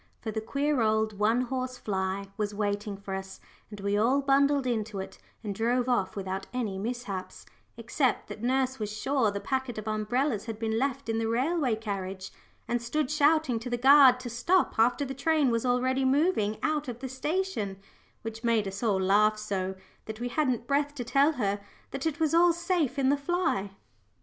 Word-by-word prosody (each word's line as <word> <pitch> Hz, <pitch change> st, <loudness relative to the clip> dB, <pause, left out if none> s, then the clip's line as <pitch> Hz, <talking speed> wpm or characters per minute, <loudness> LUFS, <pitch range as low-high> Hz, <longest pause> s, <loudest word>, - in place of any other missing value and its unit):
For 220 Hz, -, -4 dB
the 220 Hz, +1 st, -3 dB
queer 280 Hz, +3 st, 0 dB
old 215 Hz, -1 st, +1 dB
"one 225 Hz, +4 st, +3 dB
horse 255 Hz, 0 st, -3 dB
fly" 190 Hz, -3 st, -2 dB
was 205 Hz, -1 st, -3 dB
waiting 205 Hz, -1 st, -2 dB
for 195 Hz, -1 st, -7 dB
us, 190 Hz, 0 st, -6 dB, 0.3 s
and 210 Hz, -1 st, -9 dB
we 200 Hz, +1 st, 0 dB
all 235 Hz, +7 st, +3 dB
bundled 280 Hz, 0 st, +3 dB
into 220 Hz, -4 st, -2 dB
it 190 Hz, -, -7 dB, 0.2 s
and 205 Hz, -2 st, -3 dB
drove 240 Hz, +4 st, 0 dB
off 240 Hz, -7 st, 0 dB
without 190 Hz, -1 st, -4 dB
any 220 Hz, -6 st, -3 dB
mishaps, 220 Hz, -4 st, -5 dB, 0.3 s
except -, -, 0 dB
that 215 Hz, -, -8 dB
nurse 260 Hz, +1 st, 0 dB
was 210 Hz, -1 st, -3 dB
sure 240 Hz, +2 st, +1 dB
the 200 Hz, 0 st, -3 dB
packet 265 Hz, 0 st, -2 dB
of 215 Hz, 0 st, -6 dB
umbrellas 215 Hz, +2 st, 0 dB
had 225 Hz, -2 st, -5 dB
been 225 Hz, 0 st, -1 dB
left 275 Hz, 0 st, -2 dB
in 225 Hz, 0 st, 0 dB
the 225 Hz, -, -1 dB
railway 260 Hz, +2 st, +1 dB
carriage, 195 Hz, -3 st, -5 dB, 0.4 s
and 240 Hz, 0 st, 0 dB
stood 260 Hz, +4 st, -1 dB
shouting 300 Hz, -4 st, +3 dB
to 240 Hz, +2 st, -6 dB
the 240 Hz, -, -1 dB
guard 265 Hz, 0 st, +7 dB
to 250 Hz, -, -5 dB
stop 340 Hz, +4 st, +1 dB
after 245 Hz, +5 st, +3 dB
the 270 Hz, -, -5 dB
train 290 Hz, -1 st, +2 dB
was 230 Hz, +2 st, 0 dB
already 255 Hz, +2 st, +1 dB
moving 265 Hz, -, +2 dB
out 310 Hz, -2 st, 0 dB
of 240 Hz, -2 st, -5 dB
the 265 Hz, +2 st, -6 dB
station, 265 Hz, -, -2 dB, 0.5 s
which 225 Hz, +1 st, -6 dB
made 230 Hz, -3 st, +2 dB
us 195 Hz, +1 st, -6 dB
all 210 Hz, -5 st, +2 dB
laugh 210 Hz, +3 st, +3 dB
so, 190 Hz, -3 st, -3 dB, 0.3 s
that 220 Hz, 0 st, -7 dB
we 245 Hz, +1 st, -3 dB
hadn't 250 Hz, -3 st, 0 dB
breath 285 Hz, +2 st, 0 dB
to 250 Hz, -, -4 dB
tell 275 Hz, +6 st, +3 dB
her 205 Hz, -6 st, -1 dB, 0.3 s
that 275 Hz, +3 st, -2 dB
it 320 Hz, 0 st, -3 dB
was 320 Hz, -1 st, +1 dB
all 340 Hz, +1 st, +5 dB
safe 340 Hz, -5 st, -1 dB
in 265 Hz, -1 st, +2 dB
the 285 Hz, -, +3 dB
fly. 285 Hz, -, -1 dB
240 Hz, 195 wpm, -28 LUFS, 210-275 Hz, 0.5 s, guard